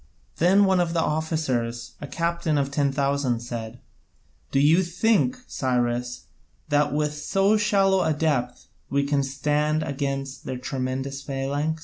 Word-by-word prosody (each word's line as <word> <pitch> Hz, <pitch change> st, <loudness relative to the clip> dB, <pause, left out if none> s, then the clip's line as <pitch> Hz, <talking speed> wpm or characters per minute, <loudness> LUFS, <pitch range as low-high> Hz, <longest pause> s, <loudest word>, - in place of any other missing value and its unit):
Then 190 Hz, +4 st, +5 dB
one 190 Hz, -1 st, +3 dB
of 170 Hz, -1 st, 0 dB
the 170 Hz, -, +1 dB
officers, 150 Hz, -8 st, -1 dB
a 145 Hz, -, -5 dB
captain 170 Hz, -1 st, -1 dB
of 140 Hz, -1 st, 0 dB
ten 140 Hz, -1 st, +1 dB
thousand, 140 Hz, -4 st, 0 dB
said: 120 Hz, -1 st, -6 dB, 0.7 s
"Do 135 Hz, -, +2 dB
you 155 Hz, +6 st, +5 dB
think, 220 Hz, +7 st, +1 dB
Cyrus, 125 Hz, -3 st, -1 dB, 0.5 s
that 145 Hz, 0 st, +2 dB
with 150 Hz, 0 st, 0 dB
so 195 Hz, +7 st, +2 dB
shallow 195 Hz, -3 st, +3 dB
a 160 Hz, -, +1 dB
depth 145 Hz, -5 st, -1 dB, 0.2 s
we 140 Hz, 0 st, +1 dB
can 140 Hz, 0 st, +1 dB
stand 150 Hz, +3 st, 0 dB
against 135 Hz, -1 st, -4 dB
their 130 Hz, -, -4 dB
tremendous 130 Hz, +1 st, -3 dB
phalanx?" 140 Hz, +3 st, -2 dB
145 Hz, 140 wpm, -25 LUFS, 135-160 Hz, 0.7 s, Then